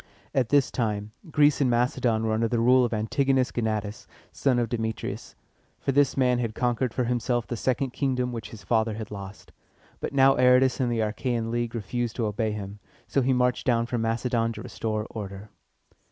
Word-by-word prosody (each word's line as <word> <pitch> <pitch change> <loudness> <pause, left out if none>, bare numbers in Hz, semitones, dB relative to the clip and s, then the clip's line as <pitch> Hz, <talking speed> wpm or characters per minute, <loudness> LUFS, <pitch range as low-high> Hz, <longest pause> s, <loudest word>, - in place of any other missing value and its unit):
At 125 -4 +1
this 145 -2 +3
time, 105 -3 -2 0.2
Greece 150 -1 +3
and 130 - +3
Macedon 120 -2 +1
were 110 - +1
under 115 +1 +1
the 115 +1 0
rule 125 +2 +5
of 120 - 0
Antigonus 130 +4 +1
Go 120 - -2
na´tas, 105 -2 -3 0.2
son 135 -3 +1
of 120 -1 +1
Demetrius; 110 -1 -4 0.4
for - - -1
this 140 0 +2
man 125 -2 +3
had 115 -3 -2
conquered 125 0 0
for 125 - -1
himself 120 0 0
the 120 - -4
second 130 +2 -1
kingdom 125 -2 -1
which 115 -2 -6
his 105 -3 -11
father 110 +2 +1
had 110 -1 -7
lost. 100 0 -9 0.5
But - - -4
now 135 0 +5
Aratus 125 +1 +4
and 125 -2 +1
the 115 -1 0
Achæan 115 +1 -1
League 120 0 -2
refused 115 +2 -3
to 115 - -1
obey 105 +1 -1
him, 100 -1 -6 0.3
so 140 - +1
he 130 +1 +2
marched 125 0 +1
down 115 -2 +3
from 120 -1 -2
Macedon 115 0 0
to - - -8
restore 110 -1 -3
order. 100 -1 -7
120 Hz, 195 wpm, -26 LUFS, 110-125 Hz, 0.5 s, rule